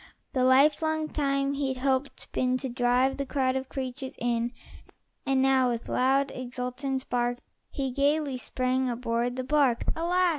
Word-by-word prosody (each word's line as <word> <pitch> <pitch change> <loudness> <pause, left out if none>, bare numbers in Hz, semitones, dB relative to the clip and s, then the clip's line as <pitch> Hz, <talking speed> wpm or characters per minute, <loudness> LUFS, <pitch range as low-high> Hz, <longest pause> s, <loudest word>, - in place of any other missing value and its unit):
The 255 - +1
lifelong 305 +4 +3
time 275 -1 0
he'd 275 -2 -2
helping 265 +1 +1 0.2
been 255 0 +1
To 265 0 -4
drive 245 +2 +2
the 275 - -2
crowd 260 -2 0
of 265 0 -3
creatures 265 0 -5
in; 235 0 0 0.8
And 265 -1 +3
now, 265 -1 +4
with 235 -1 -3
loud, 270 +2 +2
exultant 255 +2 -4
bark, 245 0 0 0.3
He 270 -3 -3
gayly 280 0 +1
sprang 255 0 0
aboard 240 0 -1
the 255 - -3
bark. 265 -3 +2
Alas! 355 +2 +2
260 Hz, 150 wpm, -28 LUFS, 250-275 Hz, 0.8 s, now